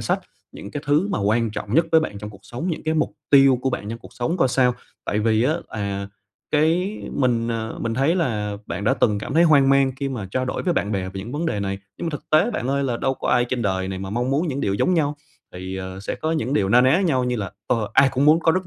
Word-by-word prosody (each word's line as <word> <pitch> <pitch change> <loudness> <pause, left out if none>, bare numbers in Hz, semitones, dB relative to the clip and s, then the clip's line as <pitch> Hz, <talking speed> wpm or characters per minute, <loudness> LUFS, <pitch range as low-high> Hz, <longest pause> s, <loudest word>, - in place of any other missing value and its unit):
sách - - 0 0.3
những 100 - -9
cái 145 - -5
thứ 150 +8 +2
mà - - -1
quan 110 +2 +1
trọng 105 +2 -5
nhất 165 +1 +4
với 160 - +7
bạn 105 -10 -4
trong 105 +1 -7
cuộc 100 - -15
sống, 125 +10 -5
những 160 - -4
cái 160 0 0
mục 155 - 0 0.2
tiêu 135 -3 +6
của 130 - +1
bạn 105 -4 -4
trong 115 +1 -5
cuộc - - -15
sống 165 +9 -2
coi 130 -7 +3
sao. 125 -1 +2 0.3
Tại 105 - -1
vì 110 +1 +2
á, 150 +5 +2
à, 100 -2 -4 0.4
cái 170 +7 +1
mình, 120 -3 +1
ờ, 110 -1 -3
mình 115 -1 -2
thấy 140 +6 +2
là 105 - -1
bạn 95 +4 -4
đã 130 +4 +3
từng 105 -4 +2
cảm 135 - -5
thấy 165 - +5
hoang 145 -5 +5
mang 135 -1 +4
khi 140 0 -2
mà 120 -7 -5
trao 130 +3 -1
đổi 125 - -3
với 180 - +1
bạn 105 -8 -1
bè 95 -2 -1
về 95 +1 -7
những 115 +6 -8
vấn 160 +3 -2
đề 105 -9 -1
này, 100 0 -3 0.2
nhưng - - -4
mà - - -1
thực 150 - -8
tế 160 +9 +4
bạn 130 - -3
ơi, 140 0 +1
là 120 -3 -1
đâu 135 +2 0
có - - -5
ai 120 0 +3
trên 125 -2 -1
đời 95 -2 -1
này 95 -1 -4
mà 95 0 -6
mong 120 +4 -1
muốn 155 +5 +1
những 140 0 -2
điều 100 - 0
giống 180 - +2
nhau. 150 -2 +1 0.4
Thì, 95 +1 -6
ờ, 95 0 -6
sẽ 100 - -4
có 160 +1 -2
những 145 -4 -1
điều 95 -8 +2
na 120 +4 +6
ná 130 +8 +4
nhau 135 -10 +1
như 125 -1 -1
là, 100 -3 -4 0.2
ờ, 110 -3 0
ai 135 0 +5
cũng 135 +3 +1
muốn 155 +2 +5
có 165 - +3
rất 185 +1 -1
125 Hz, 290 wpm, -22 LUFS, 105-150 Hz, 0.4 s, với